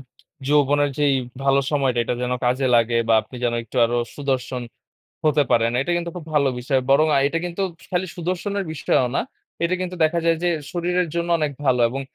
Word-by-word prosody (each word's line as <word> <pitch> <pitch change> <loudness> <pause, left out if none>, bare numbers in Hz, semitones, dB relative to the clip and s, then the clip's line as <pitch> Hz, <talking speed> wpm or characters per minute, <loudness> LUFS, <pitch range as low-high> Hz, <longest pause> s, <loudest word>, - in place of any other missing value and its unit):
য 135 - -15 0.4
যৌবনের 145 0 +3
যেই 145 -2 +3 0.3
ভালো 135 0 +3
সময়টা, 135 -4 +1
এটা 125 - -1
যেন 125 0 -1
কাজে 130 +2 +1
লাগে। 115 0 +3
বা, 115 - +5
আপনি 125 +4 -12
যেন 120 -1 +1
একটু 115 +3 -11
আরো 120 +1 0 0.2
সুদর্শন 130 -3 -2 0.6
হতে 150 -1 +4
পারেন। 115 0 +3
এটা 175 - -2
কিন্তু 170 0 -3
খুব 170 - -7
ভালো 140 -2 +3
বিষয়। 130 +1 +1
বরং 150 +3 +5
আ - - +5
এটা 165 +3 -1
কিন্তু 175 +3 -4 0.3
খালি 180 +1 0
সুদর্শনের 185 +3 -2
বিষয়ও 130 -4 +1
না। - - +2 0.4
এটা 175 +2 +1
কিন্তু 180 0 -4
দেখা 170 +2 +2
যায় 165 0 +4
যে 175 - +3 0.2
শরীরের 180 0 0
জন্য 170 0 -1
অনেক 150 -2 0
ভালো। 125 -2 +3
এবং 135 +2 -4
145 Hz, 200 wpm, -22 LUFS, 130-170 Hz, 0.6 s, বা